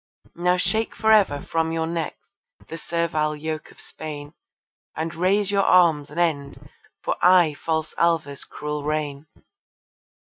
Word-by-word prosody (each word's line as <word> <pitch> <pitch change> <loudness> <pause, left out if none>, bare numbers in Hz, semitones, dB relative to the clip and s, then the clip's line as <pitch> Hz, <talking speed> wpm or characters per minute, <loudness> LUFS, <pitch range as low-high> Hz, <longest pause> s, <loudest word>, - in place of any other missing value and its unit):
Now 180 +1 +2
shake 220 +4 0
for 220 0 +2
ever 190 -10 +4
from 160 0 -1
your 165 0 -1
necks 165 -1 -3 0.5
the - - -7
servile 160 -2 -1
yoke 155 0 -5
of - - -18
Spain, 150 -1 -7 0.6
And 160 +1 -3
raise 195 +4 +1
your 200 -1 +3
arms 170 -6 +4
and 150 +4 -6
end 145 -5 -2 0.3
for - - -1
aye 180 -4 +6
false 160 +1 -2
Alva's 160 -5 +1
cruel 150 -1 -5
reign. 150 -1 -3
160 Hz, 140 wpm, -23 LUFS, 150-175 Hz, 0.6 s, aye